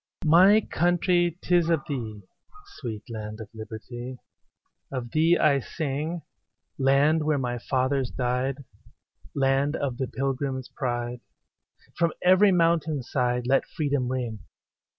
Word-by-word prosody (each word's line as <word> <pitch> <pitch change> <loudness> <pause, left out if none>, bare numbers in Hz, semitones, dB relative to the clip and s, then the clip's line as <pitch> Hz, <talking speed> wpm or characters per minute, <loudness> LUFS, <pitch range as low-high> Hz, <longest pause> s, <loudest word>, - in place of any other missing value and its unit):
My 185 +7 +7
country, 175 -1 +1
'tis 175 -2 +3
of 165 -4 +2
thee, 110 -7 -5 0.5
Sweet 110 -5 -6
land 110 -1 -6
of 110 -2 -8
liberty, 120 +3 -8 0.7
Of 125 -3 -5
thee 165 +3 +4
I 140 -2 +3
sing; 155 +4 -3 0.6
Land 140 +4 +3
where 150 -1 +1
my 120 -2 -2
fathers 130 +1 0
died, 130 +2 -2 0.7
Land 135 +2 +2
of 130 -4 -2
the 130 - -1
Pilgrims' 135 -1 -3
pride; 120 -2 -3 0.7
From 170 -2 +1
every 185 +3 +6
mountain 165 -5 +2
side, 125 -1 -1
Let 135 +2 +2
freedom 145 -4 -1
ring. 120 -4 -3
135 Hz, 120 wpm, -26 LUFS, 125-160 Hz, 0.7 s, My